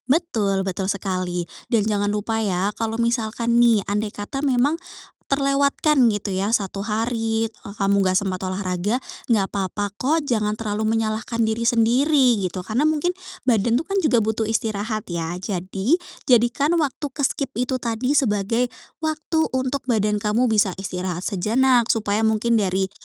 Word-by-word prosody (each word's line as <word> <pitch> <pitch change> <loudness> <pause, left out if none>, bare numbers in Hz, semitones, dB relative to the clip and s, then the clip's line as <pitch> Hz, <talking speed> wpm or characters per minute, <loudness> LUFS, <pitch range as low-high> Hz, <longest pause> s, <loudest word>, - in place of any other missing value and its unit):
Betul, 220 - +1
betul 190 0 -2
sekali. 185 -3 -2 0.2
Dan 220 -4 +2
jangan 205 -1 0
lupa 215 +2 -1
ya 195 0 0
kalau 225 0 -3
misalkan 235 0 +1
nih 230 -4 +4
andaikata 205 +5 -3
memang 280 +2 +2 0.5
terlewatkan 280 +2 +2 0.2
gitu 205 -2 -3
ya 195 +3 0
1 200 -3 -1
hari 225 +1 -1 0.2
ka 200 - -8
kamu 200 0 +3
nggak 185 0 +3
sempat 195 -2 -2
olahraga 185 +4 -1 0.3
nggak 205 -4 +3
papa 200 +1 -2
kok. 295 +9 +1
Jangan 215 -3 0
terlalu 215 -1 -2
menyalahkan 220 +1 -1
diri 225 0 +1
sendiri, 245 0 +3
gitu. 185 0 -3
Karena 220 +9 -1
mungkin 315 +3 +1 0.3
badan 235 0 +3
tuh 325 - -6
kan 395 - -2
juga 255 -6 +4
butuh 220 +1 0
istirahat 215 -1 -2
ya. 170 0 -3
Jadi, 195 - 0 0.3
jadikan 250 +6 +3
waktu 300 -2 -1
ke-skip 280 -1 0
itu 250 +1 -1
tadi 235 +2 -1
sebagai 230 -3 +1 0.3
waktu 315 +1 -1 0.2
untuk 260 +1 -2
badan 210 -3 +1
kamu 225 +4 +1
bisa 205 -4 +2
istirahat 185 -2 -4
sejenak. 235 +5 +2
Supaya 220 -1 +1
mungkin 225 +1 +2
dari, 190 -1 0
220 Hz, 150 wpm, -22 LUFS, 200-250 Hz, 0.5 s, nih